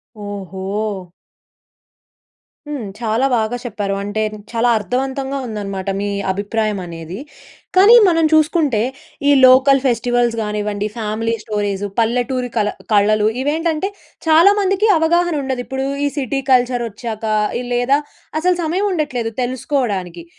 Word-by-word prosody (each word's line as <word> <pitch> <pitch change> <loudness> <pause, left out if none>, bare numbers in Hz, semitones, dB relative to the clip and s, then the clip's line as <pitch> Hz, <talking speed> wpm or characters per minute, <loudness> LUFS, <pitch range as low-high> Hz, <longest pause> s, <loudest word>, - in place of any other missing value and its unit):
ఓహో! 200 -1 -5 1.6
హ్మ్. 275 -8 -4
చాలా 230 +2 0
బాగా 225 +1 0
చెప్పారు. 205 -4 -3
అంటే 205 +2 -2 0.3
చాలా 235 +1 +2
అర్థవంతంగా 265 +6 -2
ఉందనమాట 195 -3 -4
మీ 205 - -2 0.2
అభిప్రాయం 210 +1 -2
అనేది. 165 +3 -8 0.6
కానీ 405 +6 +8
మనం 330 -2 +3
చూసుకుంటే 310 -7 +3 0.5
ఈ - - +6
లోకల్ 265 +1 +6
ఫెస్టివల్స్ 240 -1 +1
గా‌నివ్వండి 210 -1 -2
ఫ్యామిలీ 225 +1 -2
స్టోరీసు, 205 -2 -2
పల్లెటూరి 245 +2 0
కళ 210 -1 +2 0.2
కళలు 210 +1 +3 0.2
ఇవేంటంటే 320 +4 0 0.4
చాలామందికి 390 +5 +4
అవగాహనుండదు. 320 -6 +1
ఇప్పుడు 265 +1 -3 0.2
ఈ - - +2
సిటీ 270 0 -1
కల్చరొచ్చాక 240 -3 0 0.4
ఇ - - -4
లేదా 245 +4 +2 0.4
అసలు 360 +2 +2
సమయం 360 +6 0
ఉండట్లేదు 255 -9 -2
తెలుసుకోవడానికి. 225 - -2
240 Hz, 110 wpm, -18 LUFS, 210-280 Hz, 1.6 s, కానీ